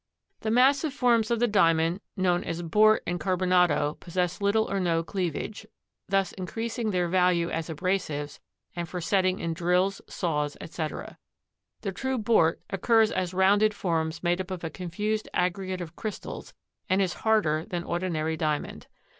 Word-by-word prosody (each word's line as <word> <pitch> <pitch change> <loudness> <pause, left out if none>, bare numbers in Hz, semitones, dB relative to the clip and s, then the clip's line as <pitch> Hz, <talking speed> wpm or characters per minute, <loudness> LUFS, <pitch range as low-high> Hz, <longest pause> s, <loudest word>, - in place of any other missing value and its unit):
The 220 - -3
massive 275 +5 +3
forms 235 -4 +3
of 235 -1 +1
the 240 - +3
Diamond 165 -3 +3 0.2
known 180 -2 +2
as 170 +1 -4
bort 215 +6 +4
and 175 0 -2
carbonado 180 -5 +2
possess 180 +2 -2
little 210 +2 +2
or 195 - -1
no 165 -2 +1
cleavage, 190 +4 -4 0.4
thus 195 -2 +1
increasing 225 +4 -3
their 180 -3 +1
value 180 -1 +2
as 165 +1 -3
abrasives 155 -3 -2 0.4
and 170 -1 -4
for 180 - -4
setting 185 +1 +1
in 165 -1 -2
drills, 180 +3 +1
saws, 150 -5 -2
etc. 155 -1 -6 0.6
The 195 - -2
true 265 +7 -2
bort 210 -8 +2
occurs 225 +3 +3
as 180 0 -2
rounded 205 +3 +4
forms 165 -4 -1
made 175 +1 +1
up 185 - -8
of 185 -2 -5
a 165 - -3
confused 210 +4 -3
aggregate 185 +1 -1
of 170 -1 -7
crystals 215 -2 -6 0.3
and 185 - +3
is 190 -3 +1
harder 200 -9 +2
than 175 0 -4
ordinary 170 -3 -1
Diamond. 155 -2 -2
185 Hz, 155 wpm, -27 LUFS, 170-205 Hz, 0.6 s, bort